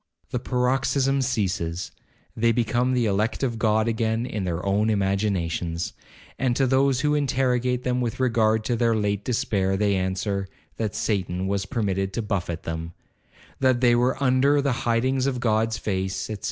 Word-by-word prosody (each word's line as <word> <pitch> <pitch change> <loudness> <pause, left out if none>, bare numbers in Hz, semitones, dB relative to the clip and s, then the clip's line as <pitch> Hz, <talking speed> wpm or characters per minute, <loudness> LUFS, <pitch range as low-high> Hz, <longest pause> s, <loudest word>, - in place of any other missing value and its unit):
The 125 - -1
paroxysm 130 +2 +1
ceases—they 100 0 -2
become 120 +2 +1
the 120 -2 +2
elect 105 +4 0
of 115 -4 -1
God 110 0 +2
again 115 0 0
in 105 -6 -3
their 90 0 -3
own 105 +3 +2
imaginations. 95 -5 -1 0.5
And 125 -2 +1
to 135 - +2
those 130 0 +2
who 150 0 +2
interrogate 125 -3 +1
them 125 0 0
with 120 0 -3
regard 110 -3 +2
to 120 - 0
their 115 -1 +2
late 100 -1 -1
despair, 100 -5 0
they 100 0 +2
answer, 95 +1 -1 0.3
That 110 -2 -2
Satan 95 -3 -1
was 95 0 -1
permitted 95 -3 -1
to 115 - -2
buffet 90 -6 -3
them—that 85 +9 -4
they 120 -1 +5
were 125 +1 +2
under 140 +2 +3
the 140 -1 +1
hidings 125 +3 +1
of 130 -2 -1
God's 110 -1 +1
face, 95 -2 -2
&c. 110 - -4
110 Hz, 155 wpm, -24 LUFS, 100-125 Hz, 0.5 s, they